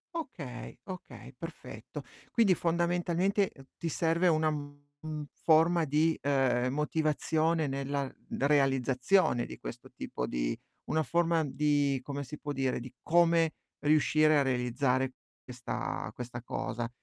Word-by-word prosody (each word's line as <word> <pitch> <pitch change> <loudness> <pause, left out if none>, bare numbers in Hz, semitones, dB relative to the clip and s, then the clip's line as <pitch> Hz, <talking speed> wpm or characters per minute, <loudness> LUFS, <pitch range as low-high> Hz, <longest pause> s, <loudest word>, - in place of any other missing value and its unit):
Okay, 145 - -6
okay, 185 -1 -9
perfetto. - - -8 0.3
Quindi 220 -6 +4
fondamentalmente 175 +3 +1 0.3
ti 165 - -3
serve 165 +3 +2
una, 155 -2 +3
mhmm, 145 +1 -6 0.2
forma 165 +1 +5
di, 155 +3 +2
ehm, 130 -3 +2
motivazione 155 +1 +1
nella 140 0 -2 0.2
realizzazione 135 0 +2
di - - -8
questo - - -8
tipo - - -4
di - - -1 0.3
una 160 0 +1
forma 170 +2 +2
di 145 -1 +1
come 140 +1 -4
si 150 +2 -8
può 145 - -4
dire, 135 -2 0
di 125 +1 -8
come 170 -1 +4 0.3
riuscire 155 +1 +4
a - - +4
realizzare 130 0 +1 0.4
questa 125 -1 -4
questa 120 -1 -6
cosa, 120 -1 -3
150 Hz, 120 wpm, -31 LUFS, 135-165 Hz, 0.4 s, forma